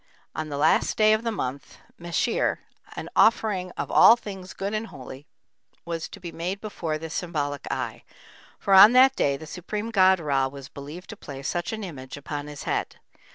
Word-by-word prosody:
On 155 0 -4
the 145 - -4
last 145 - +2
day 215 0 +5
of 215 - +1
the 230 0 -2
month 135 - -5 0.2
Mechir, 175 +7 0 0.4
an - - -6
offering 210 -5 +3
"of - - -4
all 230 - +8
things 195 -5 -9
good 200 +2 -3
and 215 +1 -2
holy" 135 - -11 0.6
was 165 -1 -4
to - - -11
be 175 -2 -7
made 180 +4 -4
before 175 -7 -4
this 160 +1 -7
symbolic 150 -6 -3
eye, 120 -2 -4 0.5
for 195 - 0
on 205 +4 +10
that 260 +1 +6
day 140 -1 +1
the 155 - -10
supreme 205 +7 -5
god 190 -3 +5
Ra 140 -4 +1
was 140 0 -10
believed 150 +9 -9
to - - -8
place 140 -8 -8
such 175 0 -2
an 220 -1 -5
image 135 -7 -8
upon 145 0 -6
his 145 -1 -8
head. - - -2
170 Hz, 190 wpm, -25 LUFS, 145-205 Hz, 0.6 s, on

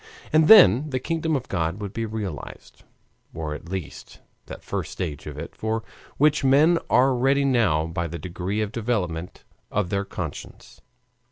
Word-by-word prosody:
And 155 0 +5
then 150 - +7
the 130 -2 -1
kingdom 160 +3 -1
of 130 -2 -3
God 85 +1 -2
would 100 -2 -6
be 115 -1 -3
realized, 105 -8 -7 0.5
or 80 -2 -4
at 85 - -9
least 95 -5 -7 0.3
that - - -9
first - - -4
stage 75 -6 -5
of 75 -1 -7
it 80 - -8
for 110 +1 -2 0.3
which 150 0 +3
men 150 +6 +5
are 130 +2 +4
ready 135 +3 +2
now 110 - +2
by 85 +1 -3
the 85 +1 -6
degree 90 +5 -4
of 105 -1 -2
development 100 -8 -3 0.3
of 100 -4 -1
their 100 0 0
conscience. 80 -7 -8
105 Hz, 165 wpm, -24 LUFS, 85-135 Hz, 0.5 s, then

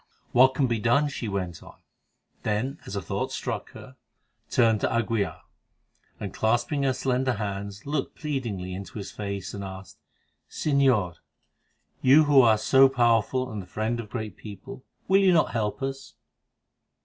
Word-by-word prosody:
"What 130 +1 +5
can 135 - +2
be 115 -3 0
done?" 140 +7 +2
she 125 -4 -5
went 95 -4 -4
on; - - -14 0.6
then, 125 +8 -2
as 100 - -5
a 100 - -3
thought - - -3
struck - - -4
her, - - -12 0.5
turned 115 -3 +3
to - - +2
d'Aguilar, 115 -2 -1 0.8
and, - - -5
clasping 120 +6 0
her 135 -1 +2
slender 130 0 0
hands, 100 -1 -5
looked 145 -1 -2
pleadingly 115 - -4
into 95 +3 -7
his 100 - -6
face 100 -2 -5
and 100 - -5
asked: 95 0 -9 0.5
"Señor, 130 - +1 0.8
you 140 +4 +6
who 145 -2 +6
are 110 -3 +5
so 135 +5 +5
powerful, 125 0 +2
and 105 -2 -4
the 90 - -12
friend 110 +2 -2
of 110 -3 -6
great 110 -5 -5
people, 105 +4 -10 0.2
will 195 +1 +5
you 190 -2 +5
not 165 - +3
help 110 +3 -2
us?" 135 0 -5
115 Hz, 160 wpm, -26 LUFS, 100-135 Hz, 0.8 s, you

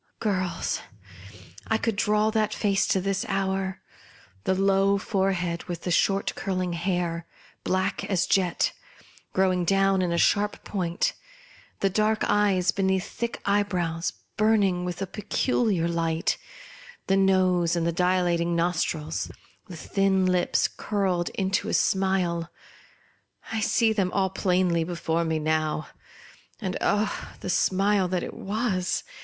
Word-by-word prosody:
Girls, 185 -5 -1 0.9
I 220 - +2
could 225 -1 -1
draw 210 +1 +2
that 215 -1 0
face 200 -2 +1
to 190 - +2
this 195 +1 -1
hour! 190 -1 -1 0.6
The 190 - +2
low 195 +1 +3
fore 195 -1 0
head, 175 -2 -3
with 175 -1 -6
the 180 - -2
short 195 +3 +2
curling 185 -2 -2
hair, 170 -1 -2 0.4
black 190 +2 0
as 190 -4 +1
jet, 185 -3 +1 0.6
growing 185 -1 +2
down 195 +1 +3
in 180 -2 0
a 170 - 0
sharp 205 +4 +2
point; 175 -4 -1 0.7
the 195 - +3
dark 215 +2 +1
eyes, 200 -3 +3
beneath 190 -1 0
thick 235 0 -4
eye 200 +1 +3
brows, 175 -4 -2 0.2
burning 205 -5 +2
with 180 +2 -3
a - - -1
peculiar 210 -2 0
light; 165 -1 0 0.7
the 195 - +2
nose 185 -3 +3
and 170 -1 0
the 170 - +2
dilating 175 -1 +1
nostrils; 165 -2 -1 0.4
the 180 -4 -9
thin 195 +2 +1
lips, 180 -1 +2
curling 190 -4 -1
into 195 0 0
a - - +1
smile, 185 -3 +1 1.0
I 220 - -1
see 220 +1 +2
them 195 -4 0
all 190 -2 +1
plainly 180 -3 +1
before 170 -1 -1
me 160 -1 0
now. 155 0 -1 0.7
And 190 -5 -3
— - - -25
0, 210 +1 +2 0.3
the 185 - -2
smile 195 +2 +2
that 180 0 -1
it - - -6
was 210 -3 -1
190 Hz, 140 wpm, -26 LUFS, 175-200 Hz, 1.0 s, low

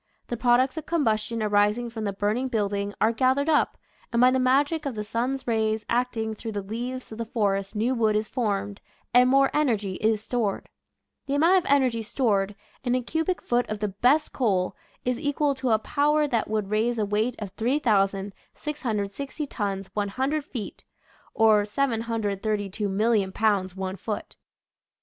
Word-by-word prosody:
The 240 - -1
products 250 +4 +3
of 315 - -5
combustion 225 -7 0
arising 210 +3 +2
from 220 -2 -4
the 200 - 0
burning 210 +6 -1
building 205 -3 -1
are 220 +2 +4
gath 260 +3 +2
ered 280 +2 0
up, 310 -2 +2 0.3
and 235 - +1
by 250 +1 +6
the 260 - +2
magic 285 +4 +2
of 265 - -4
the 210 - -3
sun's 255 +5 -2
rays 220 -2 0
acting 235 -2 0
through 220 +1 -6
the 205 -1 -3
leaves 245 +5 -5
of 220 - -8
the 230 - -2
forest 200 -3 -1
new 230 +5 +1
wood 220 -3 +2
is 215 0 0
formed, 205 -5 -2 0.3
and 250 +1 +6
more 275 +1 +4
energy 215 -10 0
is 220 0 +1
stored. 220 -2 -2 0.6
The 280 - 0
amount 340 +6 +5
of 340 - -3
energy 255 -5 +3
stored 210 -4 0 0.3
in 250 -1 +1
a 255 - 0
cubic 320 +7 -1
foot 245 0 0
of 215 - -2
the 210 0 -2
best 250 +10 +2
coal 195 -8 0 0.3
is 250 -1 0
equal 290 -1 +1
to 265 -1 -2
a 220 - +5
power 295 +6 +1
that 230 -6 -1
would 210 -2 -2
raise 230 +3 +1
a 215 - +1
weight 215 +4 0
of 205 -3 -6
3,660 220 +3 -1
tons 200 -7 -3
100 260 +9 -1
feet, 240 -8 -7 0.5
or 215 -2 +5
732, 215 -3 -1
000,000 210 -3 +2
pounds 200 -4 +1
one 190 0 -4
foot. 210 +3 -5
225 Hz, 170 wpm, -26 LUFS, 205-255 Hz, 0.6 s, by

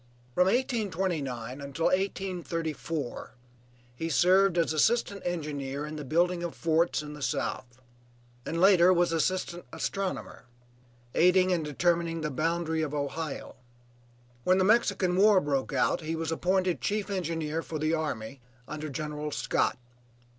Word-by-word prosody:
From 180 - +4
1829 180 - -1
until 140 +3 -3
1834, 170 -8 -2 0.6
he 165 +6 -3
served 185 +4 +4
as 165 -2 +2
assistant 200 +4 +2
engineer 145 -5 -3
in 150 +1 -6
the 150 - -5
building 170 +5 +1
of 170 -1 -4
forts 165 -1 +1
in 150 0 -8
the 150 - -10
South, 125 -2 -3 0.6
and 165 - -3
later 185 -1 +6
was 175 -1 +3
assistant 175 +1 -1
astronomer; 195 -8 -4 0.7
aiding 185 +2 +4
in 175 -2 +2
determining 165 +2 0
the 150 -1 -2
boundary 160 +3 0
of 150 -2 -2
Ohio. 145 +1 -4 0.9
When 185 +5 +4
the 190 - +3
Mexican 200 -4 +3
war 205 0 +6
broke 140 -4 -1
out 135 +3 +1
he 160 +1 -3
was 165 0 -3
appointed 180 -1 +1
chief 205 0 -1
engineer 165 -4 -2
for 160 - -5
the 155 +1 0
army 140 -5 -3 0.3
under 155 0 -5
General 150 +1 -4
Scott. - - 0
165 Hz, 135 wpm, -29 LUFS, 150-185 Hz, 0.9 s, later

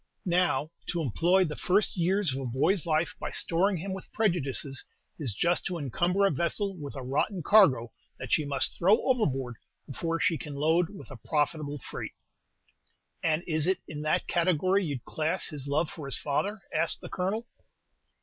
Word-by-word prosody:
Now, 170 -4 +1 0.2
to 170 - -1
employ 175 - +3
the 155 -4 -3
first 195 +3 +1
years 180 -2 +1
of 135 - -3
a - - -4
boy's 160 - +1
life 160 +3 +1
by - - -3
storing 185 +3 +1
him 190 +4 -4
with 190 - -8
prejudices, 145 - -1 0.4
is 140 -7 -2
just 175 - +2
to 180 -2 -3
encumber 175 - +1
a 195 - +3
vessel 190 +6 -1
with 145 -5 -7
a 135 - -5
rotten 150 +8 -1
cargo 145 - +5 0.3
that - - -4
she 155 - +3
must 140 -2 0
throw 200 +6 +5
overboard 135 - 0 0.3
before 165 +4 -3
she 170 -4 +1
can 150 -2 -7
load 160 +4 +2
with 195 -7 -11
a 135 - -8
profitable 150 +3 -1
freight." - - -7 1.1
"And 160 +1 +1
is 155 -1 +1
it 190 - +2
in 150 -1 -6
that 155 0 +1
category 185 +3 +2
you'd 140 -7 -4
class 160 +4 -1
his 145 -4 -6
love 150 +3 0
for 150 -4 -7
his 135 - +2
father?" 195 +9 -1
asked 165 - 0
the - - -7
Colonel. 205 +6 -2
165 Hz, 180 wpm, -29 LUFS, 145-185 Hz, 1.1 s, cargo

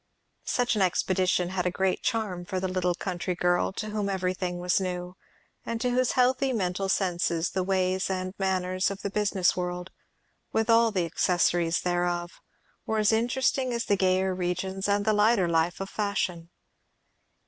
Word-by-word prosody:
Such 245 -2 +1
an 210 - 0
expedition 185 -1 +1
had 180 -1 -1
a - - +3
great 190 +1 0
charm 215 -7 -2
for 185 +1 -3
the 190 - -1
little 180 -1 0
country 180 -1 -3
girl, 175 +1 +1
to 215 +2 -4
whom 210 -1 -1
everything 185 -1 -2
was 180 +2 +1
new, 180 -1 -4 0.5
and 230 0 -3
to 250 +1 0
whose 250 0 +1
healthy 260 +1 +2
mental 195 -2 -1
senses 175 -3 0
the 190 - -1
ways 185 0 0
and 185 -1 -3
manners 185 0 0
of 200 -1 -7
the 200 - -2
business 200 -3 +1
world, 180 0 -4 0.6
with 225 +1 +1
all 230 0 +5
the 185 -5 0
accessories 170 -1 +1
thereof, 175 -1 -1 0.6
were 220 - 0
as 215 0 +3
interesting 250 +3 +1
as 235 -1 -2
the 200 - +2
gayer 185 0 +2
regions 185 +2 -2
and 205 0 +1
the 215 - +3
lighter 210 -2 +3
life 165 +1 +1
of 195 - -4
fashion. 190 -5 -2
185 Hz, 170 wpm, -27 LUFS, 180-210 Hz, 0.6 s, all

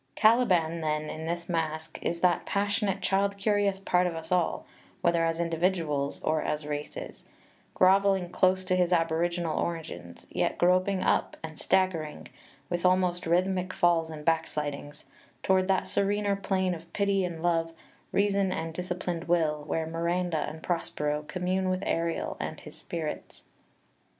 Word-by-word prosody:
Caliban, 185 -8 +3
then, 155 -1 -1
in 160 +1 -6
this 170 0 -3
Masque, 160 -2 -2
is 170 0 -2
that 180 -2 +2
passionate 200 -1 0
child 200 +1 +1
curious 200 -1 +1
part 180 -2 +2
of 170 - -3
us 160 +1 -7
all 180 -2 +1 0.4
[whether 170 -1 +3
as 165 0 0
individuals 165 -4 0
or 155 0 +1
as 150 0 -2
races], 150 - -6 0.5
grovelling 190 -1 +4
close 185 0 +2
to 185 0 +1
his 180 -1 +2
aboriginal 170 0 +1
origins, 120 - -5
yet - - 0
groping 185 +2 +3
up - - +1
and 155 -1 -7
staggering 170 -5 0 0.4
with 175 -1 -2
almost 180 -1 +2
rhythmic 185 +1 +1
falls 170 -2 +3
and 150 -2 -8
back 165 -1 +2
slidings 145 0 -5 0.4
toward 185 -1 +3
that 190 -1 +2
serener 200 0 +1
plane 190 -2 0
of 165 0 -9
pity 200 -1 +1
and 170 -2 -4
love, 165 -1 +1 0.4
reason 200 -1 +2
and 165 -2 -3
disciplined 180 0 -3
will, 155 -3 +1
where 160 0 -1
Miranda 170 0 -1
and 160 +1 -10
Prospero 150 -3 -1
commune 185 +1 -1
with 185 0 -1
Ariel 165 0 -1
and - - -4
his - - -11
Spirits. 160 -3 -6
175 Hz, 150 wpm, -28 LUFS, 160-185 Hz, 0.5 s, grovelling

